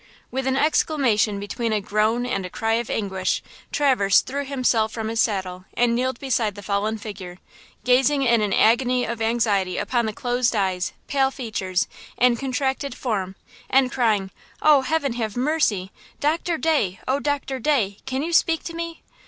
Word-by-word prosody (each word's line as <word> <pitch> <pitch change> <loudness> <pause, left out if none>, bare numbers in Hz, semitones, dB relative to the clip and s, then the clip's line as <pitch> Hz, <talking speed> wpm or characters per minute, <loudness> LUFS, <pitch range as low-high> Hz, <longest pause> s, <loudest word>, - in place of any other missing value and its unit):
With 265 +1 -2
an 265 0 +1
exclamation 245 -10 +2
between 225 +3 -3
a 215 - +1
groan 215 +4 0
and 195 -6 -2
a 180 - -5
cry 225 +4 -1
of 230 +1 -1
anguish, 190 -3 -1 0.3
Traverse 250 -10 +4
threw 280 +2 -4
himself 250 -5 +1
from 220 -1 -4
his 225 0 -2
saddle 185 -4 -1
and 240 -1 +2
kneeled 255 +1 -1
beside 230 -6 0
the 205 - -9
fallen 205 +2 -1
figure, 195 -4 -8 0.5
gazing 270 +3 +3
in 235 -3 +3
an 210 -1 0
agony 245 +4 +3
of 230 0 -4
anxiety 220 -5 +1
upon 235 +2 0
the - - -1
closed 245 +1 0
eyes, 190 -3 0
pale 270 -1 +2
features 210 -8 -2 0.3
and 245 -1 +3
contracted 265 0 -2
form 195 -7 -3 0.3
and 260 -1 +3
crying: 215 -6 +1 0.3
"Oh, 300 -3 +5
heaven 280 -1 0
have 225 -2 -3
mercy! 245 -9 +1 0.3
Doctor 330 +3 0
Day, 280 - +1
oh, 265 +2 +1
Doctor 285 -2 -2
Day! 230 -7 +1
Can 265 +1 -2
you 340 +2 -3
speak 325 -1 +3
to 335 - -6
me?" 335 0 -6
235 Hz, 170 wpm, -23 LUFS, 205-270 Hz, 0.5 s, Oh